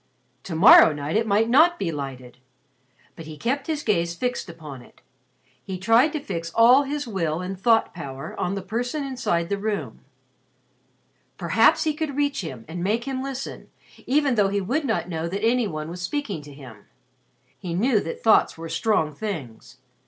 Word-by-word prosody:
To 170 - -5
morrow 160 0 +8
night 145 +3 -4
it 225 +1 +1
might 215 +2 +2
not 320 +8 +5
be 175 - -2
lighted. 130 -4 -7 0.8
But 165 - -10
he 155 -1 -9
kept 270 - -2
his 305 -2 -2
gaze 170 -5 0
fixed 245 -1 -3
upon 155 -6 -10
it. - - -20 0.6
He 190 -2 -5
tried 230 - +3
to 305 - -2
fix 170 - -5
all 245 +4 +7
his 285 0 -4
will 165 -7 -2
and 185 +1 -5
thought 225 +4 +2
power 135 -4 -7
on 185 +2 -1
the 195 - -5
person 245 +8 -3
inside 215 -11 -2
the 200 0 -1
room. 210 0 -4 1.3
Perhaps - - +3
he 310 -2 0
could 300 -2 -4
reach 285 -3 0
him 130 -10 -8
and 170 +2 -5
make 220 +5 0
him 265 0 -4
listen, 270 0 -6 0.4
even 280 0 +2
though 205 -4 +2
he 200 +1 0
would 260 +11 -1
not 225 -8 -1
know 165 -2 -3
that 200 +5 -3
any 240 0 +2
one 155 -3 -5
was 180 +1 -7
speaking 205 - -3
to 145 0 -13
him. 125 -7 -13 0.7
He 170 -2 -5
knew 225 +4 +2
that 165 - -6
thoughts 220 -6 +4
were 165 0 -7
strong 160 -6 0
things. 145 - -7
200 Hz, 180 wpm, -24 LUFS, 165-250 Hz, 1.3 s, morrow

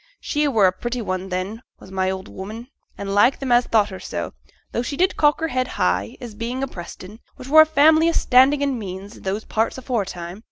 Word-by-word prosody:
She 295 0 0
were 225 -8 +3
a 185 - +5
pretty 240 +6 -4
one 185 -3 -3
then, 190 +5 -4 0.2
was 190 - -14
my 190 0 0
old 190 +1 -4
'ooman, 220 +6 -8 0.3
an' 200 - -5
liked 205 +6 +3
them 270 -2 -3
as 240 0 +4
thought 215 -2 +3
her 190 - -7
so, - - -5 0.4
though - - -1
she 275 +3 -4
did 370 +2 +2
cock 295 -1 +3
her 325 - 0
head 255 -1 -1
high, 90 +4 0
as 240 -3 -8
bein' 235 +5 -4
a - - -1
Preston, 185 +1 -10 0.2
which 255 - -10
were 315 +2 +9
a 315 - +5
family 315 +2 +5
o' - - 0
standin' 275 +2 +4
and 275 -4 -1
means 195 +1 -8
i' - - -15
those 195 +3 -3
parts 225 +3 -1
aforetime. 195 -8 -4
225 Hz, 230 wpm, -22 LUFS, 190-265 Hz, 0.4 s, were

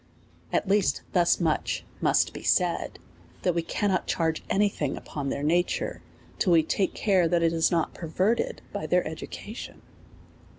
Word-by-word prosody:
At - - 0
least 200 0 +2
thus 175 -3 +3
much 160 -3 0 0.2
must - - +3
be - - -7
said^ - - +1 0.5
that 180 - +2
we 170 - 0
cannot 190 +3 -1
charge 160 -1 0
any 205 +1 +3
thing 150 -8 -3
upon 140 -2 -5
their 140 - -3
nature^ 175 +4 0 0.4
till 180 - +3
we 165 -1 +6
take 190 +4 0
care 190 -5 +3
that 170 0 +2
it 165 0 +3
is 165 0 +3
not 165 -2 0
perverted 205 - -1
by - - -3
their - - +2
education. - - -8
175 Hz, 160 wpm, -27 LUFS, 160-190 Hz, 0.5 s, we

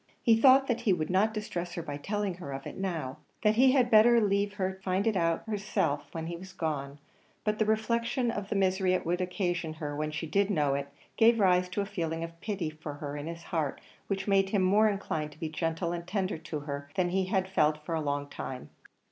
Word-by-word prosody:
He 230 -3 +6
thought 265 +3 +6
that 240 -2 -1
he 215 -5 +3
would 160 -1 -2
not 200 +4 +3
distress 180 -5 -4
her 170 - -4
by 145 -2 -5
telling 205 +4 -2
her 160 -6 -6
of 135 0 -6
it - - -7
now 165 -9 -3 0.3
that 210 -1 +5
he 255 +3 +5
had 250 -3 +3
better 230 +2 +7
leave 200 -1 +1
her 190 -2 -1
to 190 - -17
find 190 +2 0
it 225 -2 +2
out 165 -2 +1
herself 165 -9 -1
after 160 -1 -4
he 170 +1 -4
was 190 +2 -10
gone; 145 -5 -3 0.5
but 215 0 0
the 215 - +2
reflection 230 +3 +1
of 205 -2 -5
the - - -1
misery 190 -1 +2
it - - -2
would 175 +2 0
occasion 175 -3 -1
her 150 -2 -5
when 150 +1 -2
she 160 +2 -4
did 195 +6 +1
know 150 -8 +2
it, 140 0 -2 0.3
gave 230 0 +5
rise 180 -2 +3
to 195 +3 -1
a - - -1
feeling 165 -5 -3
of 165 0 -8
pity 195 -7 -2
for 155 -1 -7
her 145 0 -6
in 145 +1 -5
his 165 0 -7
heart, 160 -6 -2 0.3
which 195 0 -2
made 195 -1 +3
him 195 -2 +2
more 210 +4 +5
inclined 160 -7 -3
to 150 - -20
be 160 - -3
gentle 165 +2 -2
and 170 0 -5
tender 190 -4 -1
to 155 -2 -5
her 140 -1 -6
than 180 -1 +1
he 190 +1 +1
had 190 0 0
felt 155 -4 +1
for 165 - -3
a 160 - 0
long 145 -1 -2
time. 130 -2 -7
185 Hz, 240 wpm, -30 LUFS, 155-205 Hz, 0.5 s, better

